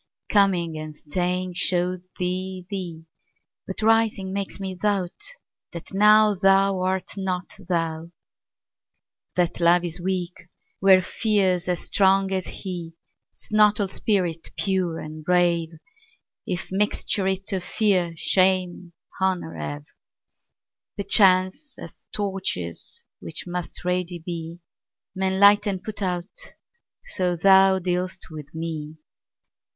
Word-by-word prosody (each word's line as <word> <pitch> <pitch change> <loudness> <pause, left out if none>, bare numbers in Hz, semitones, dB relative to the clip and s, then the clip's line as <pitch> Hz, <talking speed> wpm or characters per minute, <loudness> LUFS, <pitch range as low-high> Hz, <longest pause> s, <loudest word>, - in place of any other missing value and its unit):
Coming 180 -6 +2
and 155 -1 -7
staying 180 +4 -2
show'd 180 0 0
thee 185 0 -3
thee; 175 -5 -5 0.6
But 190 +3 -4
rising 220 -4 +2
makes 200 0 -4
me 190 -1 -4
doubt 190 -1 -1 0.6
that 170 +1 -8
nowThou 195 -2 +4
art 185 0 -1
not 185 0 -3 0.2
thou. 165 -1 -1 1.3
That 175 -2 0
Love 175 +1 +4
is 170 0 -4
weak 180 -1 -2 0.5
where 190 -1 +6
Fear's 185 -3 +1
as 180 -1 -1
strong 195 0 +2
as 185 -1 -1
he;'Tis 170 -4 -9
not 210 0 +5
all 200 - +1
spirit 180 -5 -1
pure 185 -4 0
and 155 0 -8
brave, 175 -1 +2 0.8
If 180 -1 -3
mixture 200 0 0
it 190 +1 -2
of 185 -2 -2
Fear, 185 -7 +1
Shame, 185 -1 +1 0.3
Honour 185 - 0
have. 75 -2 -6 1.1
Perchance, 200 +7 +3
as - - -12
torches, 190 - -4 0.2
which 160 - -5
must 175 0 -5
ready 180 -1 -1
be, 170 0 -7 0.5
Men 190 0 -1
light 205 +1 +6
and 190 -2 -2
put 215 -1 -4
out, 180 0 -4 0.5
so 180 - -1
thou 190 +2 +5
dealst 180 0 -2
with 150 -1 -10
me. 160 -2 -5
185 Hz, 115 wpm, -24 LUFS, 175-195 Hz, 1.3 s, where